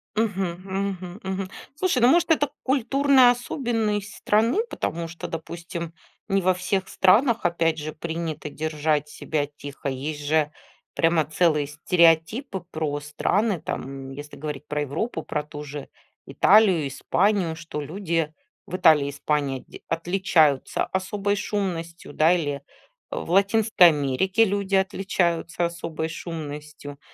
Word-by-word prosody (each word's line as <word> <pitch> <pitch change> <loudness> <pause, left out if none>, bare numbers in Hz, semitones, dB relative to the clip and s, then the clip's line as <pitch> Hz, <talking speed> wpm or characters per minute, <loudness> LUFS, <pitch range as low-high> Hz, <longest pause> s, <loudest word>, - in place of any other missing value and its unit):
Мгм, 200 -5 0
мгм, 190 -1 -4
мгм. 190 0 -3 0.3
Слушай, 330 -5 +1
ну, 240 - +7
может, 340 +4 +4
это 290 -3 +3
культурная 270 0 +4
особенность 225 -5 -2
страны? 230 - +2
Потому 165 0 -3
что, 170 +1 -7
допустим, 170 +1 -6 0.3
не 195 -1 +2
во 185 +1 +3
всех 185 +1 -1
странах, 225 +3 +3
опять 165 -2 +1
же, 155 0 -5
принято 160 -2 -4
держать 150 -1 -1
себя 150 -1 -2
тихо. 145 -1 -7
Есть 145 +3 -4
же 150 0 +2 0.4
прямо 165 -1 +3
целые 155 -2 +2
стереотипы 170 - +2
про 150 -2 -2
страны, 180 +7 0
там, 135 0 -5
если 145 +2 -9
говорить 150 -1 -6
про 150 0 -2
Европу, 160 - -3
про 150 -1 -3
ту 150 0 -8
же 145 -1 -7 0.4
Италию, 190 -8 +4
Испанию, 175 +5 +1
что 160 -2 -6
люди 165 0 -2 0.3
в 180 - -5
Италии 155 -6 +5
и - - -2
Испании 140 -2 -1
дь - - -12
отличаются 165 -4 +2
особой 200 +2 -1
шумностью, 180 -4 -3
да, 160 +3 +4
или 145 -5 -1 0.5
в - - -5
Латинской 200 -1 +5
Америке 160 - +2
люди 200 -1 0
отличаются 175 -3 0
особой 165 -2 -4
шумностью. 150 -3 -7
170 Hz, 130 wpm, -24 LUFS, 150-195 Hz, 0.5 s, ну